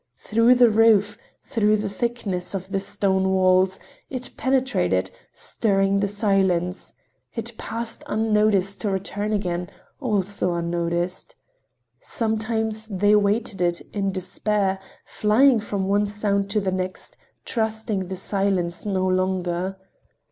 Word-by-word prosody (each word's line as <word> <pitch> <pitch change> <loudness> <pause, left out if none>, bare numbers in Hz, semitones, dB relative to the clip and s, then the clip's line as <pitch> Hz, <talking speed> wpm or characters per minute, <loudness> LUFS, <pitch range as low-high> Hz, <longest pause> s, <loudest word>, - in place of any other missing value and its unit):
Through 230 +3 +3
the 245 -2 +6
roof, 210 -2 +4 0.3
through 215 -5 +2
the 210 0 -2
thickness 200 -4 -3
of 190 0 -6
the 195 - 0
stone 190 -1 +1
walls, 185 0 +3 0.3
it 255 -1 -5
penetrated, 255 - +1 0.2
stirring 195 -2 0
the 200 - +1
silence—it 195 +3 -2
passed 230 0 -5
unnoticed, 210 -3 +1
to 210 - 0
return 200 +2 -2
again, 180 -4 -2 0.3
also 200 -7 0
unnoticed. 170 +1 -2 0.6
Sometimes 220 -1 -1
they 205 0 +2
awaited 210 0 +2
it 175 -1 +1
in 195 -2 0
despair, 190 +1 -1 0.4
living 240 +4 +5
from 200 -2 -3
one 205 +1 +2
sound 200 -1 0
to 210 +1 +1
the 190 -2 -1
next, 185 0 -3 0.3
trusting 220 -4 -2
the 190 - -4
silence 190 -2 -1
no 190 -2 0
longer. 185 0 -1
200 Hz, 120 wpm, -23 LUFS, 185-215 Hz, 0.6 s, the